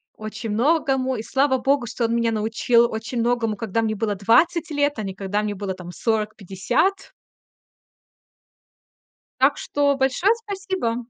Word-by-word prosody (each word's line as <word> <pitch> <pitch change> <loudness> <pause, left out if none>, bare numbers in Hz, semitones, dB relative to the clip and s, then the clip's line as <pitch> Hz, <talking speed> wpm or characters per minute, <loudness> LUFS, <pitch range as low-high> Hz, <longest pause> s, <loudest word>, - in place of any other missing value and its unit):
очень 215 +1 -6
многому. 265 +2 +1
И 220 - -5
слава 265 0 +1
богу, 270 -1 +1
что 235 +1 -2
он 230 - 0
меня 235 -1 +1
научил 230 +2 +2
очень 225 +2 -4
многому, 230 -2 0
когда 225 +1 -2
мне 215 -1 -1
было 210 -1 -1
20 310 - +2
лет, 290 0 +1
а 215 - -3
не 195 - -4
когда 200 +2 -2
мне 210 -1 -2
было 195 -1 -4
там 180 -1 -9
40- 215 +1 -1
50. 245 - -1 2.3
Так - - +4
что 285 -1 0
большое 270 - +2
спасибо. 385 - -3
230 Hz, 150 wpm, -22 LUFS, 215-280 Hz, 2.3 s, Так